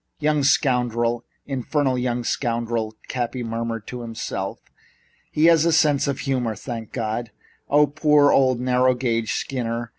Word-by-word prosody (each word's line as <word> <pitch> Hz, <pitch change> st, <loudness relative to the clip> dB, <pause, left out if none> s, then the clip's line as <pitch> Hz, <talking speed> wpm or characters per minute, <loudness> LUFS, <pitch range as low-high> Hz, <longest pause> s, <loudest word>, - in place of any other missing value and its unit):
"Young 150 Hz, -1 st, +1 dB
scoundrel! 120 Hz, -4 st, +1 dB, 0.2 s
In 135 Hz, -2 st, -3 dB
fer 145 Hz, +4 st, 0 dB
nal 130 Hz, -2 st, +1 dB
young 125 Hz, -1 st, -1 dB
scoundrel!" 115 Hz, -2 st, -2 dB
Cappy 125 Hz, 0 st, -3 dB
murmured 115 Hz, -1 st, -4 dB
to 125 Hz, -1 st, -7 dB
himself. 115 Hz, -1 st, -4 dB, 0.7 s
"He 155 Hz, -, +2 dB
has 165 Hz, -2 st, +6 dB
a 170 Hz, -, +3 dB
sense 150 Hz, -3 st, +3 dB
of 140 Hz, -, -2 dB
humor, 125 Hz, -5 st, -1 dB
thank 115 Hz, 0 st, -7 dB
God! 115 Hz, 0 st, -3 dB, 0.4 s
Ah, 150 Hz, +1 st, +5 dB
poor 150 Hz, 0 st, +3 dB
old 130 Hz, -2 st, +3 dB
narrow 125 Hz, 0 st, +2 dB
gauge 115 Hz, -3 st, -1 dB
Skinner! 120 Hz, -3 st, -3 dB
125 Hz, 150 wpm, -23 LUFS, 115-140 Hz, 0.7 s, has